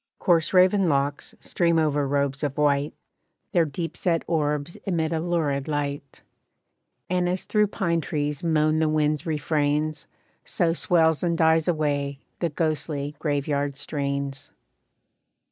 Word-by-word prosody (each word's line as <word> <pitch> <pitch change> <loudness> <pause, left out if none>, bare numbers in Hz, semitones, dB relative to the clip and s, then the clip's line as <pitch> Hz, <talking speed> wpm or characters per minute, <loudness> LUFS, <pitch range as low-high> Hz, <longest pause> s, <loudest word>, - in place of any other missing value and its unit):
Coarse 165 -3 +2
raven 185 0 +4
locks 140 0 -1
stream 170 -2 +1
over 150 -3 +1
robes 140 0 0
of 145 -3 -2
white, 145 -1 +1 0.6
Their 170 -2 +3
deep 165 +3 -5
set 170 -2 0
orbs 150 -1 -1
emit 165 -5 0
a 160 - 0
lurid 160 -5 -1
light, 145 -2 -4 0.8
And 180 0 0
as 180 +1 -2
through 210 -1 +2
pine 170 -5 -1
trees 150 -2 -2
moan 155 -1 +2
the 160 -1 +2
winds 155 0 0
refrains, 150 0 -1 0.4
So 165 -1 +1
swells 160 -2 +2
and 170 -2 0
dies 160 -1 +3
away, 145 -4 0 0.2
the 170 - 0
ghostly 150 -2 -2
graveyard 145 -1 -1
strains. 140 -1 -3
155 Hz, 130 wpm, -25 LUFS, 145-165 Hz, 0.8 s, raven